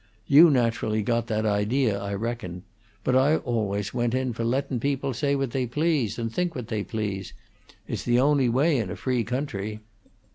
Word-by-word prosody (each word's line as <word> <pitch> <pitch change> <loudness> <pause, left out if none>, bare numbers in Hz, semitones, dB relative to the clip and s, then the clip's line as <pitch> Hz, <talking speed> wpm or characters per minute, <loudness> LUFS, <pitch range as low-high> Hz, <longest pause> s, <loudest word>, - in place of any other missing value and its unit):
You 155 +5 +8
naturally 115 -5 +1
got 115 +1 0
that 110 0 -1
idea, 105 +3 +1
I 100 0 -3
reckon; 100 -5 -4 0.4
but 130 - +1
I 135 +4 +4
always 105 -7 -2
went 120 0 0
in 130 -1 -1
for 115 - -4
lettin' 130 +1 -1
people 140 +1 -1
say 140 +4 0
what 135 -3 -1
they 130 -1 -1
please 145 - 0
and 115 -1 -3
think 175 +1 -1
what 120 -3 -6
they 105 -2 -1
please; 105 -4 -4 0.5
it's - - -3
the 120 0 +2
only 140 -2 +3
way 140 +5 +3
in 105 -5 -2
a - - -4
free 125 -3 -1
country." 110 -4 -3
120 Hz, 185 wpm, -26 LUFS, 110-135 Hz, 0.5 s, You